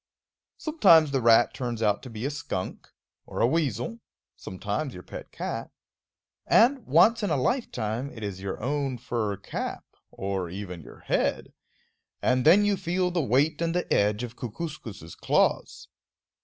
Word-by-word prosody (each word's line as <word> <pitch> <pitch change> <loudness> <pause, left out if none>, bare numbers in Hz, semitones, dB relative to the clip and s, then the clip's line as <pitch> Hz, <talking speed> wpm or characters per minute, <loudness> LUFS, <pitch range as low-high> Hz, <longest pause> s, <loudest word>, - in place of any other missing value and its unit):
Sometimes 170 - +5
the 135 -2 +1
rat 115 0 +5
turns 120 -3 -3
out 105 -1 +2
to 130 - -9
be 115 +1 -6
a 140 - -1
skunk, 145 -10 -5 0.4
or - - -6
a - - +5
weasel; 140 - -1 0.4
sometimes - - -4
your - - -9
pet - - -9
cat; - - -4 0.8
and, 250 +1 +4
once 230 +1 +5
in 205 - 0
a 150 - +1
lifetime, 125 - -1
it 110 - -9
is 95 -2 -5
your 95 -1 -4
own 140 -1 -1
fur 110 -4 -2
cap, 100 - -5 0.2
or 95 -2 -3
even 90 -2 -7
your - - -14
head; - - -1 0.7
and 125 +1 +1
then 190 +7 +7
you 205 -1 +2
feel 180 +1 0
the 175 -1 0
weight 140 +5 +2
and 165 0 0
the 180 - 0
edge 105 +3 +2
of 120 0 -6
Kookooskoos' 115 - -7
claws. - - 0
125 Hz, 155 wpm, -27 LUFS, 105-165 Hz, 0.8 s, then